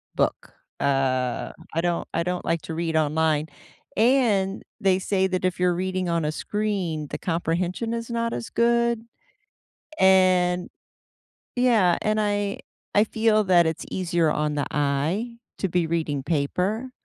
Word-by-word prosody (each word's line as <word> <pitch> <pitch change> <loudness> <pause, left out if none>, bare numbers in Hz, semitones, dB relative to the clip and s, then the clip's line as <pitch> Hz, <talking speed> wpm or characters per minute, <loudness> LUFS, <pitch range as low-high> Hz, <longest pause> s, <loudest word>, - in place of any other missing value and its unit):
book. - - -1 0.3
Uh, 130 -3 0 0.2
I 165 - +1
don't 175 0 -1
I 170 - +1
don't 180 0 -3
like 165 -1 0
to - - -6
read 165 -1 -2
online, 155 0 +1 0.5
and 220 -5 +2 0.2
they 190 -1 +3
say, 190 0 +1
that 185 -1 -2
if 185 -1 -1
you're 180 0 +3
reading 185 0 -2
on 170 -2 0
a 150 - 0
screen, 185 -5 -2
the - - -4
comprehension 175 +6 -1
is 230 0 -4
not 230 0 -1
as 120 - -5
good, 235 -1 +2 1.0
and, 185 -1 +4 0.9
yeah, 225 -8 +3
and 215 0 +1
I 205 -1 -1 0.4
I 210 - +5
feel 220 -1 +2
that 175 -3 +5
it's 160 -1 -2
easier 170 -3 +1
on 150 0 0
the 145 - -1
eye 150 - -1 0.2
to 195 - -1
be 175 -1 +1
reading 155 -4 -1
paper. 180 - -1
180 Hz, 150 wpm, -24 LUFS, 160-210 Hz, 1.0 s, I